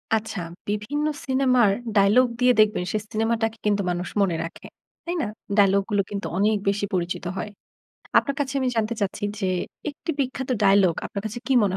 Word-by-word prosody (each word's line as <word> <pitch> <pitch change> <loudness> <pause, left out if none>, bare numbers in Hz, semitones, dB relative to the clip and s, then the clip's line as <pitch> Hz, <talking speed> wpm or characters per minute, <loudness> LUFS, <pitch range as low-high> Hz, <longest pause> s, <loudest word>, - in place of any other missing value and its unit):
আচ্ছা, 220 -2 -3 0.3
বিভিন্ন 210 +9 -1 0.2
সিনেমার 255 -4 +3 0.3
ডায়ালগ 205 +6 +5
দিয়ে 250 0 +5
দেখবেন 210 -3 +4
সেই 215 - -1
সিনেমাটাকে 225 0 0
কিন্তু 205 -1 +2
মানুষ 180 0 -2
মনে 185 -4 +2
রাখে, 165 - -9 0.4
তাই 345 +1 -2
না? 235 - -1 0.3
ডায়ালগ 200 -1 +5
গুলো 205 -1 +2
কিন্তু 200 -1 -3
অনেক 210 +2 +3
বেশি 205 +1 0
পরিচিত 180 0 -2
হয়। 210 - -3 0.7
আপনার 280 -1 -1
কাছে 275 -1 -1
আমি 260 - +1
জানতে 225 +1 0
চাচ্ছি 200 0 -2 0.2
যে 195 - 0 0.4
একটি 290 +3 -5
বিখ্যাত 265 0 -2
ডায়লগ 195 -3 +5
আপনার 200 - -5
কাছে 215 +3 -5
কী 270 - +1
মনে 190 -2 0
215 Hz, 175 wpm, -24 LUFS, 200-250 Hz, 0.7 s, ডায়ালগ